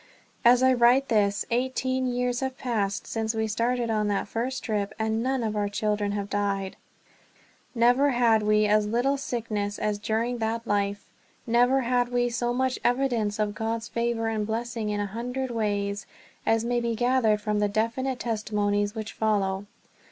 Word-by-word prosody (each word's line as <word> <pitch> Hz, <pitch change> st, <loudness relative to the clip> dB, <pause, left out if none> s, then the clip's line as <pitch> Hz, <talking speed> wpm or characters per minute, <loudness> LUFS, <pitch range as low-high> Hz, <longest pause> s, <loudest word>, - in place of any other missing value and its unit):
As 245 Hz, +2 st, +6 dB
I 260 Hz, 0 st, +5 dB
write 250 Hz, +2 st, +4 dB
this, 205 Hz, -2 st, +2 dB
eighteen 260 Hz, +1 st, 0 dB
years 245 Hz, 0 st, 0 dB
have 265 Hz, 0 st, -3 dB
passed 210 Hz, -7 st, -1 dB
since 225 Hz, 0 st, -2 dB
we 220 Hz, 0 st, 0 dB
started 235 Hz, +2 st, 0 dB
on 215 Hz, -1 st, +1 dB
that 205 Hz, -1 st, -1 dB
first 245 Hz, +5 st, -3 dB
trip, 210 Hz, -2 st, -2 dB
and 220 Hz, 0 st, 0 dB
none 260 Hz, 0 st, 0 dB
of 215 Hz, -1 st, -2 dB
our 205 Hz, -1 st, 0 dB
children 205 Hz, 0 st, -1 dB
have 200 Hz, -1 st, -3 dB
died. 200 Hz, -2 st, -1 dB, 1.0 s
Never 245 Hz, +4 st, +4 dB
had 235 Hz, -4 st, +3 dB
we 210 Hz, 0 st, +3 dB
as 210 Hz, 0 st, +3 dB
little 245 Hz, +6 st, +1 dB
sickness 220 Hz, -6 st, -3 dB
as 210 Hz, -1 st, -1 dB
during 230 Hz, +3 st, -1 dB
that 225 Hz, +1 st, -2 dB
life. 205 Hz, -1 st, -1 dB, 0.4 s
Never 245 Hz, +3 st, +3 dB
had 245 Hz, 0 st, +1 dB
we 245 Hz, 0 st, +1 dB
so 240 Hz, 0 st, -1 dB
much 260 Hz, +1 st, 0 dB
evidence 240 Hz, -5 st, +1 dB
of 210 Hz, -1 st, 0 dB
God's 225 Hz, +1 st, -3 dB
favor 235 Hz, -1 st, -1 dB
and 215 Hz, -2 st, -1 dB
blessing 225 Hz, -1 st, -3 dB
in 205 Hz, 0 st, -1 dB
a 205 Hz, -, 0 dB
hundred 245 Hz, +5 st, -4 dB
ways 205 Hz, -2 st, -2 dB, 0.4 s
as 225 Hz, 0 st, +2 dB
may 240 Hz, 0 st, +1 dB
be 235 Hz, -1 st, -1 dB
gathered 240 Hz, -3 st, +2 dB
from 210 Hz, 0 st, -1 dB
the 205 Hz, 0 st, +2 dB
definite 235 Hz, +5 st, -1 dB
testimonies 210 Hz, -2 st, -1 dB
which 220 Hz, 0 st, -5 dB
follow. 200 Hz, -2 st, 0 dB
225 Hz, 170 wpm, -26 LUFS, 210-245 Hz, 1.0 s, As